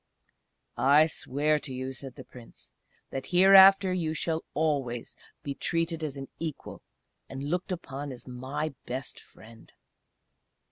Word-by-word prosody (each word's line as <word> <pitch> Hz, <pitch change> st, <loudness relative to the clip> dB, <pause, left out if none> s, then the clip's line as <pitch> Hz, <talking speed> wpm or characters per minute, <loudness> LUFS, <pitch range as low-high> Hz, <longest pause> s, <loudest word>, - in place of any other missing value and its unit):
"I 145 Hz, +3 st, +5 dB
swear 150 Hz, 0 st, -1 dB
to 145 Hz, -, -6 dB
you," 130 Hz, +1 st, -4 dB
said 130 Hz, 0 st, -8 dB
the -, -, -10 dB
Prince, 120 Hz, -2 st, -14 dB, 0.4 s
"that 135 Hz, -1 st, -5 dB
hereafter 190 Hz, +1 st, +7 dB
you 160 Hz, -3 st, -1 dB
shall 160 Hz, 0 st, -1 dB
always 140 Hz, -6 st, -1 dB, 0.3 s
be 140 Hz, -2 st, -3 dB
treated 165 Hz, +2 st, -1 dB
as 145 Hz, -3 st, -4 dB
an 135 Hz, 0 st, -7 dB
equal, 160 Hz, -4 st, -6 dB, 0.5 s
and 135 Hz, +1 st, -6 dB
looked 180 Hz, +1 st, -2 dB
upon 145 Hz, -5 st, -5 dB
as 125 Hz, -, -10 dB
my 135 Hz, +5 st, -4 dB
best 130 Hz, +1 st, -5 dB
friend!... 115 Hz, 0 st, -17 dB
145 Hz, 135 wpm, -28 LUFS, 130-165 Hz, 0.5 s, hereafter